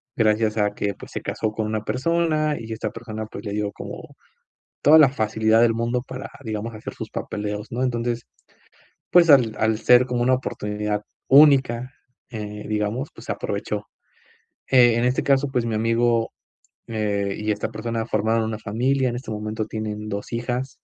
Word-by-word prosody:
Gracias 110 0 +2
a 105 -1 +1
que 100 0 -1
pues - - -13
se - - -4
casó 110 - -2
con 110 0 -3
una 110 0 -2
persona 155 +3 +1
y 115 0 -8
esta 110 -1 -3
persona, 110 -1 -6
pues, 105 -1 -9
le 100 - -3
dio 105 -1 -1
como - - -9 0.7
toda 155 +2 +7
la 145 -4 +7
facilidad 110 -2 +2
del 115 -1 +4
mundo 120 +2 -1
para, 130 0 -8
digamos, 110 +1 -4
hacer 110 - -7
sus - - -7
papeleos, 105 +1 -4
¿no? 120 +2 -1
Entonces, 120 -2 -1 0.9
pues, 175 -2 +6
al 125 -7 +6
al 110 0 +1
ser 125 +2 +5
como 125 -1 -1
una 130 +1 +3
oportunidad 105 -4 -2 0.2
única, 135 -3 +5 0.4
eh, 105 -2 -6
digamos, 110 +6 -2
pues, - - -12
aprovechó, 105 +1 -3 0.8
eh, 120 -3 +6
en 120 - +1
este 125 - +1
caso, 140 0 +2
pues, 125 -3 0
mi 115 -2 -2
amigo, 115 +1 +1 0.5
eh, 100 -3 -1
y 105 0 -2
esta 105 - -3
persona 115 +1 -3
formaron 110 +1 +1
una 110 -1 -3
familia 125 +5 0
en 120 - -4
este 125 -2 -7
momento 110 0 -3
tienen 105 -1 -5
dos 100 -1 -5
hijas. 120 +3 -2
115 Hz, 175 wpm, -23 LUFS, 105-125 Hz, 0.9 s, toda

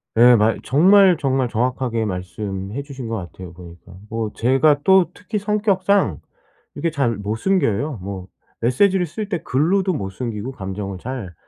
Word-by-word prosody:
네 120 +2 +7
말 110 +1 +2
정말, 185 +5 +5
정말 130 -4 0
정확하게 120 -1 -1
말씀해 95 +4 -5
주신 135 -4 -8
것 115 - -3
같아요 90 -2 -8
보니까. 85 +1 -14 0.2
뭐 110 -2 -3
제가 140 +4 +3
또 190 +1 +5
특히 210 +1 -4
성격상 200 -1 +1 0.6
이렇게 165 - -1
잘 135 -7 0
못 105 +2 -3
숨겨요. 145 - 0
뭐 95 -1 -6 0.3
메시지를 180 +10 +2
쓸 210 +7 -5
때 180 -6 -3
글로도 185 +9 +1
못 95 - -4
숨기고 115 +2 -5
감정을 95 -3 -6
잘. 120 -8 -6
125 Hz, 300 characters per minute, -20 LUFS, -, 0.6 s, 네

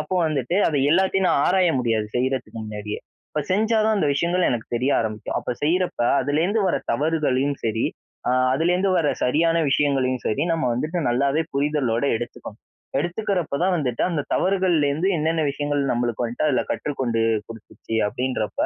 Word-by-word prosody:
அப்போ 155 +5 -3
வந்துட்டு 150 +1 -1
அத 150 - -1 0.2
எல்லாத்தையும் 190 +1 +2
நான் 140 - +3
ஆராய 185 -2 +3
முடியாது, 110 -3 0
செய்யிறதுக்கு 130 -2 -2
முன்னாடியே. 105 0 -5 0.3
இப்ப 150 - -1
செஞ்சா 220 +3 +2
தான் 220 -1 +2
அந்த 155 - +1
விஷயங்கள் 175 +4 +1
எனக்கு 115 -2 -2
தெரிய 130 +4 0
ஆரம்பிக்கும். 110 -1 -3
அப்ப - - -5
செய்யிறப்ப 180 +4 0 0.2
அதுலேருந்து 160 - +1
வர - - +1 0.2
தவறுகளையும் 145 -3 0
சரி. 110 0 0 0.4
ஆ - - +3 0.2
அதுலேருந்து 180 +5 +1
வர 155 -4 +2 0.2
சரியான 165 +6 +2
விஷயங்களையும் 130 -4 +1
சரி, 135 +7 0
நம்ம 160 -5 -1
வந்துட்டு 155 +9 -2
நல்லாவே 140 +6 +1
புரிதலோடு 140 -3 0
எடுத்துக்கணும். 110 -2 -8 0.4
எடுத்துக்கிறப்ப 175 -2 -1
தான் 185 0 +2
வந்துட்டு 125 -6 -1
அந்த 155 -4 -1
தவறுகள்லருந்து 180 -4 +1
என்னென்ன 160 +1 0
விஷயங்கள் 145 0 -1
நம்மளுக்கு 120 0 -1
வந்துட்டு 120 +6 -1
அதில 130 - +2
கற்றுக்கொண்டு 125 -6 -1 0.3
குடுத்துச்சு? 115 0 -9
அப்பிடின்றப்போ 125 -1 -2
145 Hz, 150 wpm, -23 LUFS, 125-170 Hz, 0.4 s, நான்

